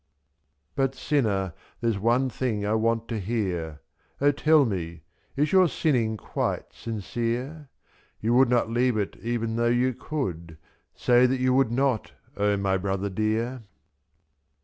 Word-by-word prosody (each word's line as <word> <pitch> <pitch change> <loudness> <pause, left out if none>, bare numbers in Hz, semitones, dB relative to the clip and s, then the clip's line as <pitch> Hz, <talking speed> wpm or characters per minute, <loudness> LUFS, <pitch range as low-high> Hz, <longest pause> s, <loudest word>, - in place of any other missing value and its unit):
But, 135 -1 0
sinner, 100 - 0 0.3
there's 115 -4 0
one 120 +5 +2
thing 115 -4 -2
I 105 - +1
want 115 +1 +1
to 115 -2 -2
hear, 90 -8 -3 0.4
O 145 +1 +4
tell 150 0 +4
me, 85 -7 -4 0.3
is 150 +2 +1
your 185 -2 +6
sinning 120 -9 0
quite - - -3
sincere? 120 +7 -4 0.5
/74V - - -35
You 115 +2 +2
would 130 0 +5
not 120 -2 +2
leave 120 0 +2
it 100 -2 -2
even 115 -1 -2
though 120 0 +2
you 125 +2 +2
could, 85 - -5 0.4
Say 125 +1 +4
that 130 +1 0
you 130 0 +2
would 130 -3 +3
not, 130 -2 0 0.2
O 105 0 +1
my 95 -1 +1
brother 100 +1 -2
dear. 110 +5 -1
115 Hz, 150 wpm, -26 LUFS, 105-130 Hz, 0.5 s, your